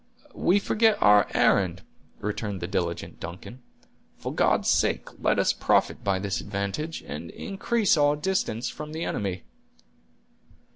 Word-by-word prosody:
"We 185 - +2
forget 220 +1 +2
our 105 0 +6
errand," 95 -1 +2 0.4
returned 105 -1 -3
the 85 - -3
diligent 85 -2 -3
Duncan. 90 +8 -9 0.6
"For - - -5
God's - - +2
sake - - +2
let - - +2
us - - +3
profit - - +1
by 100 -1 +1
this 95 0 -2
advantage, 100 +11 -4
and 75 +4 -7
increase 205 - 0
our 145 0 +4
distance 150 -8 -1
from 150 0 -7
the 160 +1 -3
enemy." 95 -3 -3
105 Hz, 135 wpm, -26 LUFS, 95-160 Hz, 0.6 s, our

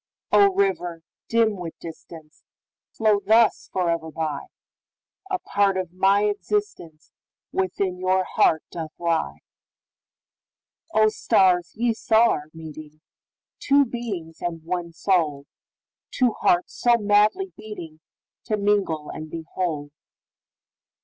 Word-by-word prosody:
O, 400 -1 +6
river, 180 - 0 0.2
dim 225 -3 +2
with 170 -3 -7
distance, 160 -1 -12 0.5
Flow 215 -2 +2
thus 220 +2 +3
forever 170 -3 -1
by,A 160 - -7
part 200 - +1
of 180 -2 -4
my 195 +2 +3
existenceWithin 190 - -3
your 185 0 +2
heart 160 -3 +2
doth 160 -2 -6
lie!O, 170 - -4
stars, 180 -4 +2
ye 235 +1 +1
saw 225 +1 +3
our 150 0 -4
meeting, 155 -1 -11 0.6
Two 280 0 +4
beings 205 -10 -6
and 165 -2 -4
one 170 0 -3
soul, 160 -5 0 0.6
Two 250 -2 +2
hearts 175 -4 +1
so 240 -1 +4
madly 210 - +2
beatingTo 210 +1 -8
mingle 200 -7 0
and 155 0 -7
be 165 0 -7
whole! 150 -5 -2
185 Hz, 105 wpm, -24 LUFS, 160-215 Hz, 0.6 s, O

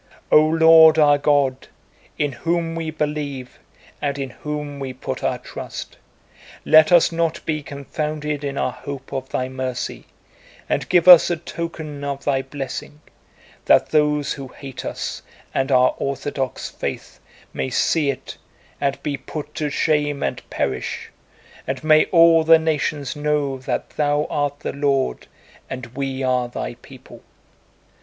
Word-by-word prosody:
"O 150 - +7
Lord 160 0 +7
our 145 -2 +5
God, 140 -3 +1 0.5
in 145 -1 0
whom 165 +5 -1
we 165 -1 -3
believe 150 -4 -4 0.4
and 140 -1 -1
in 135 -2 -4
whom 150 0 -6
we 135 -1 -5
put - - -6
our - - 0
trust, - - -8 0.7
let 155 +1 +6
us 175 -1 +6
not 165 -1 -1
be 155 -1 -1
confounded 150 +1 -4
in 140 -1 -3
our - - 0
hope 135 +2 -8
of 130 -1 -4
Thy 130 - -2
mercy, 130 -1 -4 0.6
and - - -1
give 180 -1 +3
us 180 -3 +10
a 175 - 0
token 160 -3 -6
of 140 -1 -4
Thy 135 -2 +1
blessing, 135 +2 -7 0.7
that - - +4
those 150 -2 +2
who 135 -1 -8
hate 135 0 -9
us - - -4 0.3
and 135 +1 0
our 130 -1 +4
Orthodox 135 -1 -3
faith - - -6 0.3
may 65 -1 -2
see 155 -4 +1
it 135 - -5 0.4
and 140 -1 0
be 145 -2 -2
put 150 +3 -7
to 155 -2 -2
shame 145 -1 0
and - - -2
perish, 65 -1 -3 0.6
and 135 0 -3
may 155 0 +5
all 165 -1 +5
the 165 0 +7
nations 155 -3 -1
know 145 -2 -1
that 130 - -3
Thou 145 0 +1
art 145 -1 -1
the - - -4
Lord 140 - 0 0.4
and 130 -2 -5
we 135 -1 -3
are 125 -1 +1
Thy 120 - -5
people. - - -15
145 Hz, 150 wpm, -21 LUFS, 135-155 Hz, 0.7 s, us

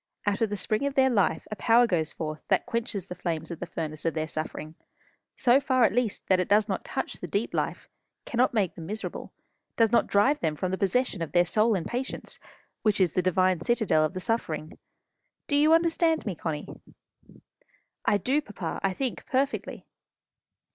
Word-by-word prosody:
Out 205 +1 0
of 225 - +2
the 205 - -2
spring 215 +7 0
of 280 - -4
their 265 -1 +4
life 200 -5 +1
a - - -2
power 235 +3 +4
goes 160 -7 0
forth 155 -1 -5
that - - +2
quenches 225 -5 -3
the 180 - -5
flames 170 -2 -4
of 170 - -6
the 180 - -5
furnace 155 -2 -5
of 165 - -1
their 155 0 -1
suffering, 155 0 -5 0.6
so 255 +1 +4
far 260 -2 +2
at 205 -4 +4
least 240 -3 0
that 185 -1 +3
it 180 - 0
does 210 +1 +4
not 195 - -2
touch - - -3
the - - -6
deep - - -2
life, - - -2 0.4
cannot 245 +2 +2
make 205 -7 0
them 160 -1 -9
miserable, 215 +3 -5 0.4
does 225 -2 +3
not 235 - +3
drive 260 +9 +3
them 155 -2 -1
from 180 +4 -2
the 190 - -1
possession 200 0 0
of 165 - -4
their 175 0 +5
soul 215 +5 +3
in 175 - -2
patience, 250 +2 -5 0.4
which 210 -2 +2
is 180 -4 +3
the 185 - +2
divine 185 -1 +2
citadel 220 -7 +2
of 155 +4 -1
the - - -2
suffering. 165 -8 -3 0.7
Do 285 - 0
you 300 +2 +5
understand 330 0 +3
me, 205 - -2
Connie?" 155 -2 -5 1.2
"I 205 - +3
do, 265 +10 +1
papa. 195 - -5
I 195 -1 0
think 260 +4 -4
perfectly." 275 +1 -1
205 Hz, 195 wpm, -27 LUFS, 170-245 Hz, 1.2 s, their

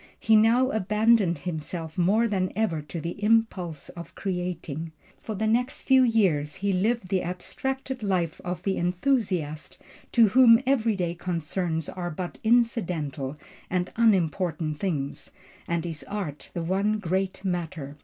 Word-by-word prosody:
He 220 - +4
now 235 +5 +4
abandoned 210 -3 +3
himself 160 0 -5
more 205 +7 +3
than 190 -4 0
ever 205 -8 0
to 150 +3 -7
the 170 +5 -5
impulse 205 -9 +1
for 170 0 -7
creating. 170 -4 -4 0.3
For 220 - -5
the 215 +3 -1
next 245 +4 0
few 265 -1 +5
years 190 - +2
he 200 0 -1
lived 205 +1 0
the 190 -2 +1
abstracted 265 +9 -4
life 180 -5 -1
of 180 0 -4
the 195 -1 0
enthusiast 180 - -1 0.4
to 230 -3 +6
whom 230 +1 +7
every 235 -5 +2
day 175 -3 -1
concerns 170 -1 -2
are 175 -1 -4
but 175 +2 -6
incidental 175 - 0 0.3
and 180 0 -1
unimportant 175 -7 +1
things, 145 -8 -3 0.4
and 170 0 -1
his 165 -3 -5
art 190 -8 -5
the 170 - -2
one 195 +5 +1
great 190 0 -2
matter. 165 -6 -3
185 Hz, 145 wpm, -26 LUFS, 165-220 Hz, 0.4 s, whom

